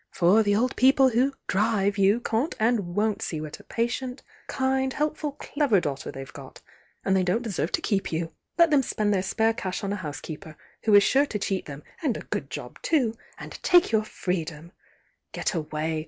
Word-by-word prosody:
For 185 +6 +4
the 205 -1 +2
old 250 +5 +1
people 265 +1 +5
who 255 +3 +2
drive 205 0 +1
you 200 +4 +4
can't 235 +7 -1
and 215 -6 +1
won't 210 0 +1
see 160 - -3
what 155 0 -7
a - - -15
patient, 250 +2 -3 0.2
kind, 265 0 0
helpful 300 0 -2
clever 285 -7 +1
daughter 140 -5 -4
they've 135 0 -9
got, - - -11 0.5
and 190 - +3
they 190 - +3
don't 185 +6 0
deserve 195 -6 -2
to - - +1
keep 195 -2 0
you. 165 0 -2 0.3
Let 335 -2 +5
them 290 -2 +5
spend 210 -4 0
their 190 - +2
spare 220 +4 +1
cash 190 -5 -4
on 200 0 -1
a - - -2
housekeeper, 155 -1 -7 0.3
who 215 -2 +5
is 200 - +8
sure 280 +6 +3
to 215 - -3
cheat 195 -2 -2
them 145 0 -8 0.2
(and 285 -8 0
a - - -7
good - - -4
job - - -8
too!) 260 -9 +2 0.2
and - - -9
take 355 -6 +5
your 220 -1 +3
freedom 170 -5 -4 0.6
Get - - -1
away! 155 -1 -2
210 Hz, 200 wpm, -26 LUFS, 180-255 Hz, 0.6 s, is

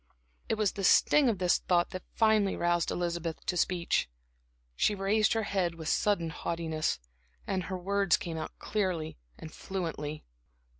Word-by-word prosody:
It - - +2
was 215 -2 +1
the 195 - -6
sting 275 +8 +5
of 220 - 0
this 180 -1 +2
thought 175 -1 +1
that 185 - -5
finally 215 -3 +3
roused 175 0 +1
Elizabeth 170 -2 -3
to 180 - -1
speech. 175 - +1 0.7
She 210 - +2
raised 205 +2 +2
her 225 -1 0
head 185 -4 -1
with 160 -1 -5
sudden 175 -6 +1
haughtiness, 160 - -2 0.5
and 185 -2 -2
her 185 +2 -4
words 195 0 +2
came 160 -2 -4
clearly 180 - -2 0.2
and 155 - -10
fluently. 155 -5 -4
180 Hz, 150 wpm, -30 LUFS, 165-200 Hz, 0.7 s, sting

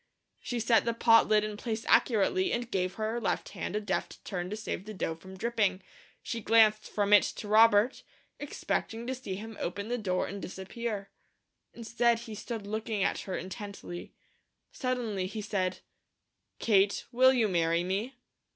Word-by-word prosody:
She 245 - -3
set 230 0 +4
the 235 0 -1
pot 230 -1 +5
lid 215 -1 +4
in 215 0 -3
place 225 0 -4
accurately 320 - +3
and 240 0 -2
gave 185 -1 -1
her 220 +2 -2
left 205 - -1
hand - - -5
a - - +1
deft 205 -3 -3
turn 180 -2 -3
to 210 - -3
save 215 -3 -5
the 215 0 -7
dough 165 - -2
from 190 +4 -12
dripping. 205 -4 0 0.4
She 230 -2 -4
glanced 215 0 +4
from 205 0 +1
it 205 - +9
to 210 - -5
Robert, 220 +2 +5 0.4
expecting 235 -5 -3
to 260 - -2
see 250 -7 -5
him 220 +3 -8
open 200 +5 -4
the 245 0 -1
door 185 -4 0
and 200 +1 -6
disappear. 200 +2 -5 0.6
Instead 235 0 +1
he 225 -2 -8
stood 215 0 -6
looking 215 -1 -2
at - - 0
her 190 - -4
intently. 190 -1 -7 0.6
Suddenly 235 -8 -2
he 210 +3 -6
said: 190 -3 -2 0.8
"Kate, 200 -2 +2
will 260 +1 +6
you 240 -4 +2
marry 170 -2 +1
me?" 200 +8 -2
215 Hz, 170 wpm, -30 LUFS, 195-230 Hz, 0.8 s, it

